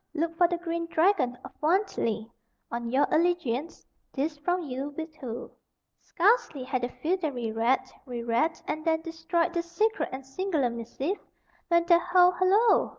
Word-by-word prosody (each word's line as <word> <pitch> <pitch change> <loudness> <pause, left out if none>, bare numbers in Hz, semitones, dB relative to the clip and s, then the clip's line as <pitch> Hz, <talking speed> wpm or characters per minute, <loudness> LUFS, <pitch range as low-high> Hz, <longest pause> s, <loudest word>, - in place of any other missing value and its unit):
Look 330 +1 -1
for 350 +1 +5
the 345 0 -1
green 335 -1 -3
dragon 320 -8 +2
of - - -9
Wantley. 305 - +1 0.4
On 235 0 -3
your 265 +4 +3
allegiance. 335 -4 0 0.3
This 300 +3 -2
from 355 +3 0
ye 265 -3 -4
wit 310 +3 -5
who." 240 -3 -6 0.5
Scarcely 360 - +2
had 255 -1 -2
the 245 - -1
feodary 305 -9 -2
read, 235 +4 +2 0.2
re 240 -2 -4
read, 240 +8 +1
and 310 0 -3
then 320 0 +1
destroyed 330 +1 -1
this 340 -1 -3
secret 435 +5 +1
and 265 0 -6
singular 290 -3 -1
missive, 250 - -3 0.5
when 340 -1 +3
the 340 -1 +6
"Ho! 360 +1 +5
hollo!" 380 +6 +4
325 Hz, 155 wpm, -28 LUFS, 260-350 Hz, 0.5 s, the